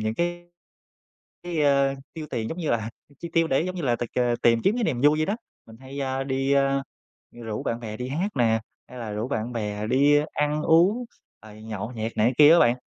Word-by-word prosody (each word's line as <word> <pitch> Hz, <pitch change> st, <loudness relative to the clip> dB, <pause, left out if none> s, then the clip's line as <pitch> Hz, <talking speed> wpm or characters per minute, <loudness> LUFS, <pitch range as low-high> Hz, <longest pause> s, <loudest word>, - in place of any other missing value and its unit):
những 110 Hz, 0 st, -1 dB
cái 175 Hz, +3 st, -2 dB, 1.0 s
cái, 175 Hz, -3 st, -3 dB
ơ, 140 Hz, -1 st, +3 dB, 0.2 s
tiêu 160 Hz, -2 st, -7 dB
tiền 110 Hz, -1 st, -3 dB
giống 165 Hz, -, -6 dB
như 165 Hz, -4 st, -2 dB
là 110 Hz, -1 st, -1 dB, 0.3 s
chi 170 Hz, -, -6 dB
tiêu 165 Hz, -1 st, +3 dB
để 135 Hz, -4 st, +1 dB
giống 185 Hz, +1 st, -4 dB
như 175 Hz, -, -4 dB
là 120 Hz, -4 st, +1 dB
tịch, 120 Hz, -1 st, -5 dB
à, 120 Hz, -1 st, +2 dB
tìm 115 Hz, -1 st, +4 dB
kiếm 205 Hz, -, +3 dB
cái 240 Hz, -1 st, -1 dB
niềm 130 Hz, -, -1 dB
vui 150 Hz, +3 st, +4 dB
vậy 155 Hz, -, +1 dB
đó. 200 Hz, -, -1 dB, 0.3 s
Mình 110 Hz, -, -14 dB
hay, 135 Hz, +2 st, -8 dB
a, 135 Hz, 0 st, -2 dB
đi, 135 Hz, 0 st, 0 dB
a, 135 Hz, 0 st, +2 dB, 0.5 s
rủ 115 Hz, -3 st, -6 dB
bạn 115 Hz, +1 st, -3 dB
bè 110 Hz, -2 st, -6 dB
đi 125 Hz, +3 st, -5 dB
hát 165 Hz, +9 st, -1 dB
nè, 115 Hz, -3 st, +2 dB, 0.3 s
hay 125 Hz, -, -10 dB
là 115 Hz, -3 st, -5 dB
rủ 105 Hz, +3 st, -3 dB
bạn 115 Hz, -2 st, -3 dB
bè 105 Hz, -2 st, -3 dB
đi 140 Hz, +5 st, +4 dB
ăn 150 Hz, +1 st, 0 dB
uống, 180 Hz, +11 st, +4 dB, 0.4 s
rồi 110 Hz, 0 st, -13 dB
nhậu 110 Hz, +1 st, -5 dB
nhẹt 115 Hz, -1 st, -5 dB
này 110 Hz, -, +3 dB
cái 125 Hz, -, +1 dB
kia 150 Hz, +1 st, +9 dB
á 170 Hz, -, +6 dB
bạn. 120 Hz, -4 st, +4 dB
135 Hz, 235 wpm, -25 LUFS, 115-155 Hz, 1.0 s, kia